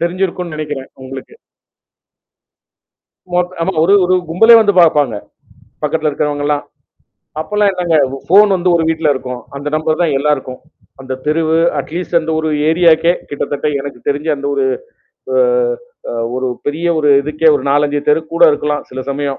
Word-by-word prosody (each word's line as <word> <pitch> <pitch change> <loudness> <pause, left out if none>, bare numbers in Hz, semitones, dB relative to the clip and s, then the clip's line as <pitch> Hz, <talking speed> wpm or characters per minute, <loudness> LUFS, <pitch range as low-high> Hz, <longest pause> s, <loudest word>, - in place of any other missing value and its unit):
தெரிஞ்சிருக்குன்னு 180 0 -2
நெனக்கிறேன், 150 -3 -6
உங்களுக்கு. 135 - -9 2.0
ஓட் 180 0 -1
ஆமா. 190 +3 -1
ஒரே, 190 +5 +4
ஒரு 185 - +2 0.2
கும்பலே 225 +8 +6
வந்து 205 -2 +3
பாப்பாங்க. 150 -8 +3 0.7
பக்கத்தில 155 +1 0
இருக்குறவங்கள்லா. 145 0 -1 0.8
அப்பெல்லாம் 205 +5 +1
என்னங்க, 175 -3 -1 0.3
ஃபோன் 205 +3 +6
வந்து 180 0 0
ஒரு 165 - +1
வீட்ல 160 -1 0
இருக்கும். 125 -2 -6
அந்த 140 +1 -6
நம்பர் 155 0 -1
தான் 165 -4 +1
எல்லாருக்கும். 140 -3 -2 0.4
அந்த 130 0 -5
தெருவு, 160 +1 +1 0.2
அட் - - -6
லீஸ்ட் 175 -1 -1
அந்த 160 0 -4
ஒரு 160 0 -1 0.2
ஏரியாக்கே, 165 0 +4 0.2
கிட்டத்தட்ட 145 0 -3
எனக்கு 135 -2 -7
தெரிஞ்சு 145 +3 -1
அந்த 140 0 -7
ஒரு 135 -1 0 0.7
அ, - - +2 0.7
அ - - -4 0.2
ஒரு 130 0 -1 0.2
பெரிய 155 +4 -2
ஒரு 150 -1 +1
இதுக்கே, 155 +2 +1
ஒரு 130 - -6
4,5 145 0 +1
தெரு 150 +2 +4
கூட 170 - +1
இருக்கலாம். 150 0 -2
சில 130 - -6
சமயம். 140 0 -3
155 Hz, 150 wpm, -15 LUFS, 145-170 Hz, 2.0 s, கும்பலே